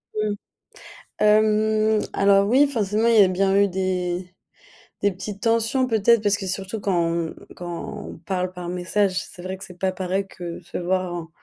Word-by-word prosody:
Mmh. 215 -1 0 0.9
Hem, 215 0 +3
alors 200 0 +4
oui 265 +6 +5
forcément 220 -3 +1
il 230 -2 +6
y - - +10
a - - +2
bien 195 +1 +1
eu 200 0 +4
des, 180 -1 -2 0.7
des 200 0 +3
petites 200 +2 -7
tensions 230 +3 +2
peut-être 225 -1 +3
parce 205 -1 +2
que 195 - -6
surtout 195 +3 -4
quand 190 -3 +1
on 165 -1 -2 0.2
quand 175 -1 -6
on - - -10
parle 180 +2 -3
par 180 -1 -7
message, 185 +2 0
c'est 175 - -12
vrai 185 +1 -4
que 190 - -10
c'est 180 -1 -13
pas 190 0 0
pareil 185 +1 -2
que 175 -2 -7
se - - -6
voir 185 0 -1
en 170 -2 -5
195 Hz, 185 wpm, -23 LUFS, 180-215 Hz, 0.9 s, y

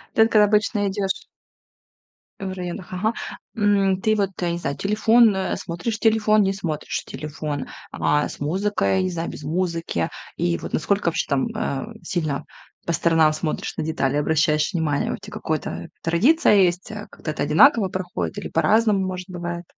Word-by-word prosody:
Так 220 0 +4
обычно 210 +1 +4
идешь 195 0 -1 1.2
В 190 -1 -4
районах, 180 +1 -6
ага. 215 +5 0 0.4
М, 200 -3 +2
ты 215 +2 +2
вот, 200 -2 +1
я 175 - 0
не 170 - -2
знаю, 140 -4 -3
телефон, 220 +2 +4
э, 190 - -1
смотришь 195 +7 -4
телефон, 215 -1 +3
не 195 0 +2
смотришь 170 -6 -3
телефон, 150 -1 -5 0.3
а, 150 0 +1
с - - -10
музыкой, 190 +4 +1
не 185 - -1
знаю, 170 -1 -3
без - - -9
музыки. 165 - -1 0.3
И 85 -1 0
вот - - -7
насколько 200 +4 0
вообще 165 - -1
там, 140 +4 +1
э, 215 -10 -2 0.2
сильно 155 -7 -2 0.4
по 170 - -1
сторонам 160 -2 +3
смотришь, 155 0 -3
на - - -2
детали 145 -3 0
обращаешь 155 0 +2
внимание, 155 -4 0
у - - -2
тя 205 +2 -11
какое-то 85 - -4
традиция 215 - +4
есть, 185 +1 +2
э, 210 -1 -7
как-то 155 - -6
это 150 - -3
одинаково 200 - +5
проходит 180 - -4
или - - -5
по-разному, 215 -3 +3
может, 185 0 -5
бывает? 175 -1 -5
180 Hz, 165 wpm, -23 LUFS, 155-205 Hz, 1.2 s, одинаково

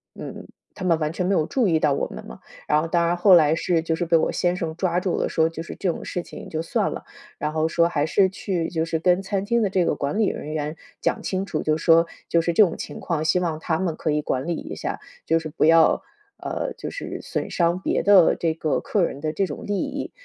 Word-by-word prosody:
嗯， - - -8 0.3
他 185 - -7
们 165 -2 +3
完 155 0 -1
全 180 0 -2
没 195 - +1
有 155 -4 +2
注 250 -6 +1
意 160 -2 +2
到 150 -3 +2
我 - - -1
们 - - -9
嘛。 - - -11 0.3
然 150 +1 +3
后 165 - -3
当 170 -1 +2
然 175 - +1
后 190 +1 +6
来 155 -1 +5
是 170 -1 +1
就 160 0 -1
是 175 - -2
被 165 0 +3
我 - - +1
先 175 0 0
生 160 -2 -3
抓 175 -1 0
住 180 -1 -1
了， - - 0
说 160 0 +2
就 165 0 -7
是 - - -8
这 185 - -1
种 - - -7
事 180 - -3
情 - - -10
就 160 0 -2
算 165 - -1
了， - - -6 0.3
然 150 +1 -2
后 160 0 +1
说 170 0 +3
还 150 -3 0
是 190 +4 +3
去 180 -3 -2
就 160 -2 -1
是 165 -1 -2
跟 180 +2 +3
餐 195 0 -2
厅 235 +1 +1
的 205 - +1
这 185 -3 +1
个 - - +1
管 145 +8 -2
理 215 - +4
人 150 - -4
员 150 +1 -3 0.3
讲 - - 0
清 190 0 -2
楚， 155 - -3
就 155 0 +1
说 165 +1 +5 0.2
就 170 - +3
是 170 - 0
这 215 - +7
种 170 - 0
情 - - -7
况， 160 -3 -2
希 180 +3 +3
望 165 -3 -2
他 160 -1 -1
们 170 -4 -1
可 155 - -1
以 150 0 +1
管 130 -1 -2
理 170 - 0
一 - - -7
下， - - -4 0.3
就 165 - +3
是 160 - -6
不 - - -1
要， 165 0 +5 0.4
呃， - - -4
就 - - -5
是 - - -6
损 - - -4
伤 170 +1 +1
别 - - -1
的 195 -4 +6
这 165 -2 0
个 155 -2 0
客 200 -4 0
人 140 -4 -3
的 155 -1 -1
这 195 - +1
种 150 - -7
利 205 - -1
益， 280 0 -4
165 Hz, 290 characters per minute, -23 LUFS, 160-185 Hz, 0.4 s, 这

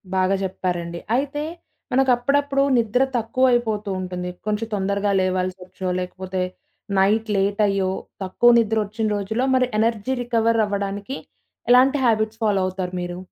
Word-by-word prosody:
బాగా 185 +1 +2
జెప్పారండి. 175 -3 -3 0.2
అయితే, 285 +3 -1 0.5
మనకప్పుడప్పుడు 275 +2 +2
నిద్ర 235 +1 +1 0.2
తక్కువయిపోతూ 230 -3 +1
ఉంటుంది. 180 -1 -4 0.2
కొంచెం 215 +1 -1
తొందరగా 200 +1 0
లేవాల్సొచ్చో 185 0 -2
లేకపోతే, 185 +1 -4 0.6
నైట్ 215 +3 +2
లేట్ 200 +2 +1
అయ్యో, 195 -1 0 0.3
తక్కువ 240 +6 +3
నిద్రొచ్చిన 220 0 0
రోజుల్లో 220 +6 -1
మరి 255 -1 +3
ఎనర్జీ 230 +2 0
రికవరవ్వడానికి 220 -1 0 0.5
ఎలాంటి 265 +3 +6
హాబిట్స్ 220 -1 +1
ఫాలో 205 -3 +2
అవుతారు 185 -1 -4
మీరు? 175 0 -5
210 Hz, 115 wpm, -22 LUFS, 190-240 Hz, 0.6 s, ఎలాంటి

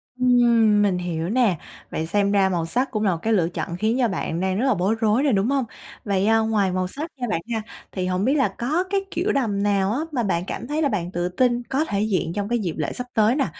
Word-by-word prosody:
Ừm. 235 -4 +4
Mình 195 -3 +2
hiểu 175 -1 -3
nè, 225 -7 +2 0.3
vậy 160 - -2
xem 200 +4 +1
ra 195 -2 +3
màu 170 -3 -1
sắc 255 +10 -1
cũng 215 -3 -1
là 195 - +3
một 170 - -1
cái 225 - +1
lựa 175 -5 +2
chọn 170 -1 -4
khiến 220 +5 +1
cho 240 - +3
bạn 175 -3 -3
đang 190 +2 0
rất 260 - +1
là 265 - +4
bối 195 +4 +1
rối 225 +4 +2
rồi, 280 - +2
đúng 200 +5 +1
hông? 275 -3 +1 0.4
Vậy, 200 -2 +1
à, 225 0 +4
ngoài 215 -4 +1
màu 185 0 -1
sắc 305 - -6
nha 245 - -3
bạn 165 - -1
ha, 220 - -1 0.3
thì 185 -2 -3
hổng 185 +2 0
biết 270 - +3
là 270 - +3
có 305 +9 0
cái 395 0 +1
kiểu 385 +5 0
đầm 215 -7 0
nào 200 -1 +2
á 250 - -1
mà 250 -5 -1
bạn 180 -3 0
cảm 240 - -5
thấy 300 +2 -1
là 285 - +2
bạn 180 -6 -2
tự 175 0 -2
tin 240 +5 +1
có 285 +4 +1
thể 200 -5 -1
diện 185 -6 0
trong 205 +2 -3
cái 240 -1 +1
dịp 175 -6 -2
lễ 155 - -2
sắp 250 0 -6
tới 220 +3 +3
nè? 275 -3 +1
210 Hz, 275 wpm, -23 LUFS, 185-245 Hz, 0.4 s, Ừm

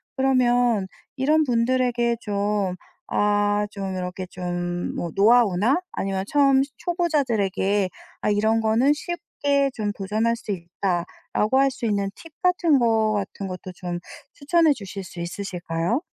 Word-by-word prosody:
그러면 245 -5 +3 0.3
이런 300 +4 +3
분들에게 240 -1 +1
좀 205 -2 -1 0.3
아 205 0 +2
좀 195 -2 -4
이렇게 185 0 -4
좀 175 -1 -3
뭐 170 - -3
노하우나 225 - +4
아니면 190 -1 -2
처음 275 -2 +4
시 280 - -9
초보자들에게 230 - 0 0.3
'아 - - +1
이런 220 +2 +2
거는 225 +5 +3
쉽게 285 -4 -1
좀 210 -3 -2
도전할 215 +4 0
수 225 - -6
있다.'라고 185 +6 -1
할 275 0 +4
수 260 -2 -5
있는 200 -2 0
팁 330 - -13
같은 350 -5 +3
거 225 -2 +2
같은 200 -1 -3
것도 185 0 -7
좀 175 -1 -4 0.3
추천해 315 +1 +3
주실 200 -4 -7
수 185 -1 -10
있으실까요? 175 - -2
215 Hz, 270 characters per minute, -24 LUFS, 195-265 Hz, 0.3 s, 노하우나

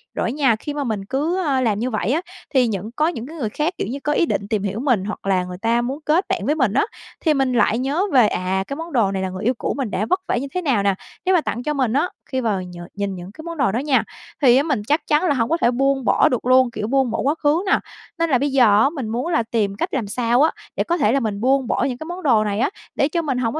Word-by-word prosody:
Rồi - - -1
á - - -2
nha, 270 -5 +2
khi 290 +6 -6
mà 290 -1 -2
mình 215 -6 -3
cứ, 300 - -1
a, 270 -3 +1
làm 215 -5 +1
như 245 +3 -1
vậy 215 -2 -1
á, 315 +5 +1 0.3
thì 255 -3 +4
những 210 0 -4
có 305 +3 +2
những 255 -8 -4
cái 320 - -10
người 225 -7 -2
khác, 305 - -1
kiểu - - -2
như, 270 +4 -4
có 295 - +1
ý 335 - +3
định 200 -10 -2
tìm 210 -2 -1
hiểu 205 +2 -2
mình 245 -8 +1
hoặc 215 - -6
là 185 -2 +2
người 180 0 -7
ta 230 +4 +1
muốn 265 +5 -3
kết 325 +5 +2
bạn 380 -1 -1
với 300 - +1
mình 255 -9 +1
á, 275 - +3 0.4
thì 315 - +3
mình 270 -3 +1
lại 230 -1 +3
nhớ 280 +8 0
về, 245 -5 +6
à, 190 0 -1
cái 275 - -4
món 330 -1 -7
đồ 220 -6 +2
này 190 -1 -2
là 190 - -2
người 185 +2 -6
yêu 245 - +2
cũ - - -2
mình 255 -7 -2
đã 215 - -1
vất 370 - +2
vả - - +1
như 275 - -3
thế 365 - 0
nào 260 - +1
nè, 200 -1 +2 0.3
nếu 375 0 +4
mà 345 - +4
tặng 240 -4 -4
cho 300 - -1
mình 255 -5 0
á, 300 +6 +1 0.2
khi 260 - 0
mà 215 -5 0
nh 180 -1 -9 0.2
nhìn 200 -1 -3
những 180 +2 -9
cái 315 - -11
món 335 -1 -6
đồ 200 -9 +2
đó 225 - -1
nha, 275 -1 +2 0.4
thì 255 -3 +6
á, 275 - +3
mình 290 -9 -1
chắc 300 +3 +1
chắn 300 +2 +3
là 350 - +2
hổng 235 -3 0
có 330 - +2
thể 240 - +4
buông 270 0 +1
bỏ - - +4
được 250 - -2
luôn, 255 -1 +4
kiểu, 210 - -4
buông 265 -1 +1
bỏ - - -2
quá 285 +3 +1
khứ 305 +5 +3
nè, 395 - +3 0.4
nên 335 0 +1
là 260 - +4
bây 280 +2 -1
giờ 265 -2 +5 0.2
á, 275 - +4
mình 275 -7 -5
muốn 240 +7 -2
là 325 -9 +1
tìm 215 -3 -1
cách - - -3
làm 235 -6 -1
sao 240 +3 +1
á, 315 - +4 0.2
để - - +1
có 345 0 0
thể 280 -9 +2
là 275 - +2
mình 210 -5 -3
buông 265 +1 +2
bỏ - - 0
những 250 - -4
cái 315 - -7
món 350 +2 -7
đồ 230 -7 +4
này 205 0 -2
á, - - +2 0.3
để 275 - +2
cho 335 +2 0
mình 275 -6 -2
hổng 230 -3 0
có 315 - -2
255 Hz, 320 wpm, -21 LUFS, 215-295 Hz, 0.4 s, về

